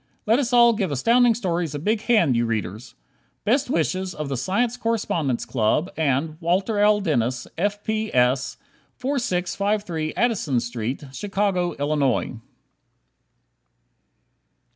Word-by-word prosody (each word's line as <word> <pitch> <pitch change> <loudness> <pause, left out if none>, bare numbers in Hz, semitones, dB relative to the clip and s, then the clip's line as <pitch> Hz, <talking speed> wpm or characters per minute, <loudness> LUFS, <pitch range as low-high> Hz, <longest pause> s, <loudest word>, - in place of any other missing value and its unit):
Let 225 +4 +3
us 255 -3 -1
all 235 -1 +6
give 200 -5 -1
Astounding 235 - +3
Stories 175 -8 -2
a - - -1
big 210 +8 0
hand, 210 - +3
you 115 0 +1
readers! 110 +1 -4 0.5
Best 255 +5 +2
wishes 185 - -1
of 150 -2 -4
the 135 - -2
Science 225 - 0
Correspondence 205 - -1
Club 130 - 0
and 155 +1 0
Walter 190 +5 0
L. 210 0 +4
Dennis, 130 - 0
F. 205 +5 -1
P. 220 0 -2
S., 125 +1 +1 0.4
4653 200 - -2
Addison 200 - +1
St., 120 +3 -4
Chicago, 195 0 -1
Illinois. 145 -4 0
180 Hz, 120 wpm, -23 LUFS, 135-215 Hz, 0.5 s, all